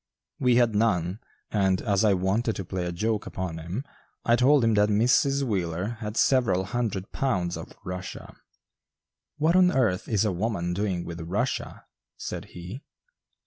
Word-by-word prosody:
We 125 Hz, -3 st, +3 dB
had 120 Hz, -2 st, +4 dB
none, 100 Hz, -3 st, +1 dB, 0.3 s
and, 95 Hz, -3 st, +2 dB
as 100 Hz, -2 st, +1 dB
I 105 Hz, -3 st, +4 dB
wanted 100 Hz, +5 st, 0 dB
to 95 Hz, -, -5 dB
play 90 Hz, 0 st, -3 dB
a -, -, -2 dB
joke 105 Hz, +4 st, -1 dB
upon 90 Hz, -3 st, -4 dB
him, 90 Hz, -, -5 dB, 0.4 s
I 120 Hz, -, +5 dB
told 130 Hz, +2 st, +4 dB
him 115 Hz, -1 st, +3 dB
that 105 Hz, 0 st, +4 dB
Mrs. 130 Hz, +6 st, +3 dB
Wheeler 95 Hz, -1 st, -2 dB
had 105 Hz, -1 st, -5 dB
several 120 Hz, -8 st, +3 dB
hundred 100 Hz, -2 st, -3 dB
pounds 90 Hz, -10 st, 0 dB
of -, -, -8 dB
"Russia." 90 Hz, +1 st, -6 dB, 1.0 s
"What 160 Hz, +3 st, +2 dB
on 185 Hz, -1 st, +6 dB
earth 110 Hz, -, +1 dB
is 110 Hz, -1 st, +1 dB
a 105 Hz, -, +2 dB
woman 90 Hz, -2 st, -1 dB
doing 95 Hz, -2 st, -1 dB
with 85 Hz, 0 st, -6 dB
'Russia?'" 105 Hz, +10 st, -3 dB, 0.3 s
said -, -, -5 dB
he. 90 Hz, +9 st, -9 dB
105 Hz, 160 wpm, -26 LUFS, 90-120 Hz, 1.0 s, on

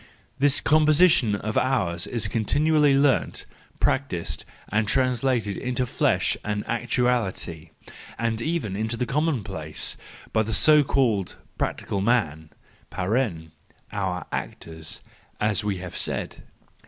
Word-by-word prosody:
This 140 Hz, 0 st, +3 dB
composition 155 Hz, -, +4 dB
of 110 Hz, +2 st, -1 dB
ours 95 Hz, -10 st, 0 dB
is 115 Hz, -4 st, -1 dB
continually 145 Hz, +6 st, +3 dB
learnt, 140 Hz, -2 st, +2 dB, 0.3 s
practised, 130 Hz, -11 st, -1 dB, 0.2 s
and 105 Hz, 0 st, +1 dB
translated 125 Hz, -3 st, +1 dB
into 125 Hz, 0 st, -1 dB
flesh -, -, +1 dB
and 105 Hz, 0 st, -2 dB
actuality, 115 Hz, -9 st, -1 dB, 0.5 s
and 115 Hz, -1 st, -1 dB
even 155 Hz, -, -2 dB
into 110 Hz, +3 st, -2 dB
the 125 Hz, -, 0 dB
commonplace, 110 Hz, -, -1 dB, 0.4 s
by 110 Hz, -, +3 dB
the 110 Hz, 0 st, -1 dB
so 150 Hz, +4 st, +6 dB
called 115 Hz, -9 st, +1 dB, 0.2 s
practical 100 Hz, -, -2 dB
men 80 Hz, -9 st, 0 dB, 0.4 s
(our 90 Hz, -, -3 dB
actors, 80 Hz, -1 st, -5 dB, 0.4 s
as 105 Hz, -1 st, +1 dB
we 100 Hz, -2 st, -1 dB
have 90 Hz, -1 st, -8 dB
said). -, -, -4 dB
110 Hz, 110 wpm, -25 LUFS, 95-130 Hz, 0.5 s, so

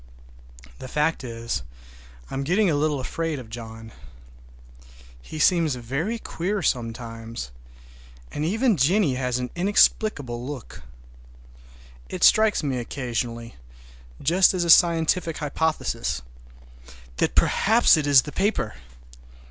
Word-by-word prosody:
The -, -, -8 dB
fact 150 Hz, +3 st, 0 dB
is, 115 Hz, -, -4 dB, 0.7 s
I -, -, -7 dB
am 135 Hz, -, -2 dB
getting 180 Hz, +5 st, +2 dB
a -, -, +1 dB
little 150 Hz, -1 st, 0 dB
afraid 160 Hz, +4 st, -3 dB
of 120 Hz, -4 st, -10 dB
John. 115 Hz, -1 st, -9 dB, 1.3 s
He 155 Hz, -, -9 dB
seems 160 Hz, -3 st, +3 dB
very 140 Hz, -, -3 dB
queer 195 Hz, -1 st, -3 dB
sometimes, 115 Hz, -, -4 dB, 0.8 s
and 145 Hz, -, -4 dB
even 220 Hz, +5 st, +1 dB
Jennie 160 Hz, +2 st, +2 dB
has 125 Hz, -1 st, -1 dB
an 125 Hz, 0 st, -4 dB
inexplicable 175 Hz, -, +1 dB
look. 135 Hz, -2 st, -8 dB, 1.3 s
It -, -, -4 dB
strikes 215 Hz, -5 st, +5 dB
me 135 Hz, -3 st, -1 dB
occasionally, 120 Hz, -2 st, -4 dB, 0.6 s
just 180 Hz, +6 st, +3 dB
as 180 Hz, -, 0 dB
a 170 Hz, -, +4 dB
scientific 165 Hz, -1 st, +3 dB
hypothesis, 140 Hz, -, -2 dB, 0.9 s
that -, -, 0 dB
perhaps 225 Hz, +4 st, +4 dB
it 150 Hz, -2 st, -1 dB
is 140 Hz, -3 st, +6 dB
the 150 Hz, -, -8 dB
paper! 195 Hz, -, -1 dB
145 Hz, 115 wpm, -24 LUFS, 120-175 Hz, 1.3 s, is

